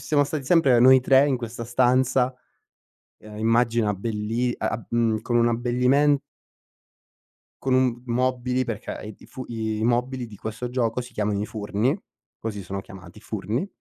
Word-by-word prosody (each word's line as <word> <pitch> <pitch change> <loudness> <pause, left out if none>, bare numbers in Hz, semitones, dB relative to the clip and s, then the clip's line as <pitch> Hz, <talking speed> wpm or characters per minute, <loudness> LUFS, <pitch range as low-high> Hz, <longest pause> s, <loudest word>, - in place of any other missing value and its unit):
siamo 145 -2 +2
stati 145 -1 -4
sempre 140 -6 +4
noi 130 +2 +7
3 135 +2 +5
in 135 -3 +1
questa 115 -1 -6
stanza, 125 +1 +2 0.9
uhm, 105 0 -11
immagina 115 -1 +2
belli 115 +4 -2
a - - -1
ab 115 - -4
mhmm, 115 -2 +1
con 120 - 0
un 120 0 +4
abbellimen 125 +5 +2 1.4
con 130 -1 +1
un 125 -2 +1
mobili, 125 +1 0
perché 115 -3 -5
i 105 0 -8
i - - -16
fu 130 -1 -8
i 110 -2 -3
i 110 - -1
mobili 125 +1 0
di 105 -3 -12
questo 115 +4 -5
gioco 120 -1 -1
si 125 0 -9
chiamano 105 -1 -1
i 105 - -2
furni, 110 - -1 0.4
così 105 -3 -5
sono 95 +2 -5
chiamati, 95 +1 -13
furni 110 - -3
120 Hz, 165 wpm, -24 LUFS, 110-130 Hz, 1.4 s, noi